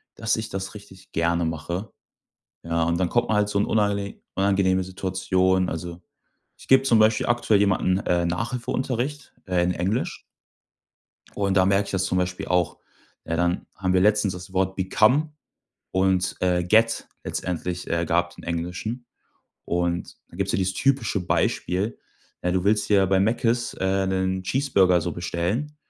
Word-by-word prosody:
dass 110 0 0
ich 110 0 -4
das 95 +1 -5
richtig 100 -3 -14
gerne 85 +1 +1
mache. 85 +6 -4 0.7
Ja, 85 0 0
und 85 +1 +1
dann 90 - +1
kommt 120 +4 +1
man 105 - +2
halt 105 0 +2
so 100 - 0
in 100 - +2
unangene 100 -2 0 0.2
unangenehme 95 -1 +2
Situationen. 95 0 0
Also, 85 +2 -6 0.6
ich - - -16
gebe 135 0 +6
zum 120 -5 +4
Beispiel 110 0 +3
aktuell 120 -3 +3
jemanden, 95 -2 +2
äh, 85 -1 +1
Nachhilfeunterricht, 125 +7 -3
äh, 90 -2 +1
in 90 - +1
Englisch 95 +8 -2 1.2
und 100 -1 0
da 95 - +5
merke 100 +1 +2
ich - - -6
das 95 0 0
zum 90 - 0
Beispiel 90 0 -2
auch, 90 -2 0 0.5
ne, 80 - -2
dann 85 +1 0
haben 95 -1 -1
wir 90 - +4
letztens 105 -1 +3
das 90 +1 -10
Wort 95 0 0
become 115 +11 +2 0.6
und, 95 -1 +1
äh, 90 -1 +2
get 110 +5 +2 0.2
letztendlich, 90 0 -4
äh, 85 0 0
gab's 85 +1 0
im - - -12
Englischen. 90 +9 -4 0.6
Und 85 0 -2
da 85 - -14
gibt's 100 0 -1
ja - - +1
dieses 95 0 0
typische 130 -7 +1
Beispiel, 95 +5 0 0.4
ja, 90 - 0
du 95 0 0
willst 105 +1 +2
ja 100 -2 +5
dir - - 0
bei 95 0 +3
Mäckes, 115 +3 +1
äh, 95 +1 0
'nen 95 0 -1
Cheeseburger 95 -7 +3
so 85 0 -3
bestellen, 90 - -2
95 Hz, 165 wpm, -24 LUFS, 90-105 Hz, 1.2 s, gebe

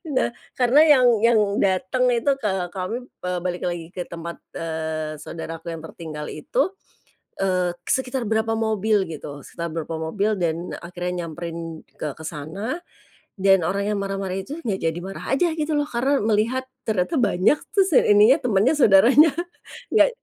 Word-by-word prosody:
Nah - - +2 0.3
karena 255 +4 +5
yang 280 -5 +6 0.2
yang 230 -1 +5 0.2
datang 195 +6 +2
itu, 240 +4 +2
eee, 190 -4 0
kami, 190 +4 -3 0.3
eee, 180 0 -1
balik 180 -1 -2
lagi 175 -2 -3
ke 180 -1 -3
tempat, 170 0 -6 0.2
eee, 160 -2 -3
saudaraku 165 +1 -6
yang 165 - -7
tertinggal 155 -2 -7
itu, 260 - 0 0.7
eee, 185 -2 +1 0.2
sekitar 260 0 0
berapa 220 0 +1
mobil 215 -3 +1
gitu, 145 -2 -7
sekitar 170 0 -5
berapa 165 0 -4
mobil 200 +7 -1
dan 170 0 -2
akhirnya 175 0 -4
nyamperin 165 0 -6 0.2
ke 150 -2 -3
ke - - -11
sana 175 - -4 0.6
dan 195 -1 +5
orang 200 +3 -1
yang 210 -1 0
marah-marah 195 -1 -3
itu 195 +11 -5
nggak 200 -4 -1
jadi 165 0 0
marah 195 +2 -7
aja 330 +4 +2
gitu 310 0 -1
loh 290 - +1
karena 265 +4 +1
melihat 225 +5 +1 0.2
ternyata 215 - 0
banyak 200 +5 +3 0.2
terus 390 -1 +3
yang - - +5
ininya 220 +7 +7
temannya 225 +2 +3
saudaranya. 255 +6 +7 0.6
Nggak - - +6
190 Hz, 155 wpm, -23 LUFS, 170-230 Hz, 0.7 s, ininya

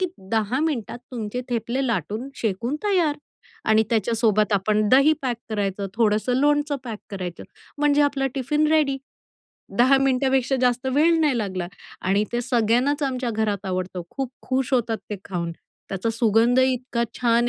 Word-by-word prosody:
की 370 - +2 0.3
10 225 +4 +1
मिनिटात 245 -6 -3
तुमचे 230 0 -3
ठेपले 240 +3 -1
लाटून 220 - -2
शेकून 230 +6 -1
तयार. 350 -8 +2 0.5
आणि 220 0 +4
त्याच्यासोबत 220 -2 +2
आपण 210 +2 +2
दही 275 +5 +6
पॅक 245 -3 -1
करायचं, 200 -2 -1
थोडंसं 220 +2 +2
लोणचं 290 +1 +2
पॅक 225 -4 -5
करायचं 180 -3 -6 0.3
म्हणजे 295 0 +4
आपला 280 -2 +1
टिफिन 295 +3 +1
रेडी 285 -4 +2 0.8
10 260 +3 +6
मिनिटापेक्षा 265 0 +2
जास्त 250 +1 +1
वेळ 325 +3 +4
नाही 290 -6 +2
लागला. 185 -5 -3 0.3
आणि 200 +3 +2
ते 240 - 0
सगळ्यांनाच 245 +4 +1
आमच्या 255 -3 -1
घरात 210 -2 -1
आवडतं 185 -1 -3
खूप 270 -3 -4
खुश 260 0 -1
होतात 230 -2 0
ते 210 - -2
खाऊन. 170 -3 -3 0.4
त्याचा 195 +3 -1
सुगंधही 235 +3 +3
इतका 250 -1 -3 0.2
छान 240 0 +3
240 Hz, 150 wpm, -23 LUFS, 215-270 Hz, 0.8 s, दही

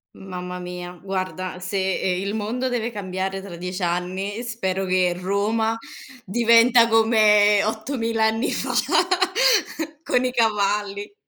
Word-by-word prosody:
Mamma 180 -1 -7
mia, 180 0 -7
guarda 185 -1 -4
se, 190 0 -1
ehm, 180 -1 0
il 205 - -2
mondo 225 +4 -2
deve 240 -2 -2
cambiare 190 -2 -4
tra 180 -4 -8
10 180 +2 -5
anni, 185 +5 -2
spero 195 -6 -2
che 185 -1 +2
Roma 210 +5 0 0.5
diventa 235 +2 +5
come 215 -2 +4
8000 225 +1 -2
anni 225 +5 0
fa, - - -2 1.3
con 250 -5 +1
i 250 - 0
cavalli. 205 - 0
205 Hz, 120 wpm, -22 LUFS, 185-225 Hz, 1.3 s, diventa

